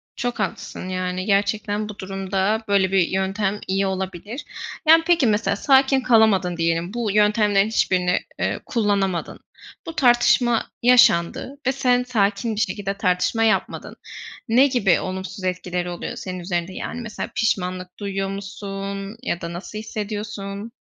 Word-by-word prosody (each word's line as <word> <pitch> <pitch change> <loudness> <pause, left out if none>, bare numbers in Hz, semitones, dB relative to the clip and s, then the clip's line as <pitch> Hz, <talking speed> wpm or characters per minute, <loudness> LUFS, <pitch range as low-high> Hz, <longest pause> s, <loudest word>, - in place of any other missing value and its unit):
Çok 245 -1 -3
haklısın. 190 -2 -4
Yani 185 0 -2
gerçekten 205 +1 0
bu 205 - -9
durumda 195 +3 -1
böyle 195 -2 +2
bir 190 -3 +3
yöntem 195 +2 -1
iyi 195 +1 +1
olabilir. 190 - -5 0.4
Yani 325 +1 +7
peki 340 -7 +4
mesela 210 -2 +1
sakin 265 +3 +4
kalamadın 220 -7 +3
diyelim. 165 +3 0
Bu 235 -3 -1
yöntemlerin 210 -1 +3
hiçbirini, 180 -5 +1 0.2
eee, - - -1
kullanamadın. 200 -6 -1 0.5
Bu 330 - -7
tartışma 240 -3 +3 0.2
yaşandı 245 +1 +4
ve - - +4
sen 250 -2 +2
sakin 215 -2 0
bir 210 - -1
şekilde 195 -1 -2
tartışma 190 +4 +1
yapmadın. 220 - 0 0.5
Ne 255 +5 +6
gibi 240 -9 +2
olumsuz 190 +1 -5
etkileri 180 -1 -2
oluyor 175 - -5
senin 185 -1 -6
üzerinde? 175 0 -3
Yani 245 - -5
mesela 225 -3 -5
pişmanlık 185 -3 -1
duyuyor 195 -1 -2
musun 195 +1 -6
ya 175 -9 -2
da 170 0 -5
nasıl 190 +4 -7
hissediyorsun? 210 -1 -5
200 Hz, 140 wpm, -22 LUFS, 190-225 Hz, 0.5 s, Yani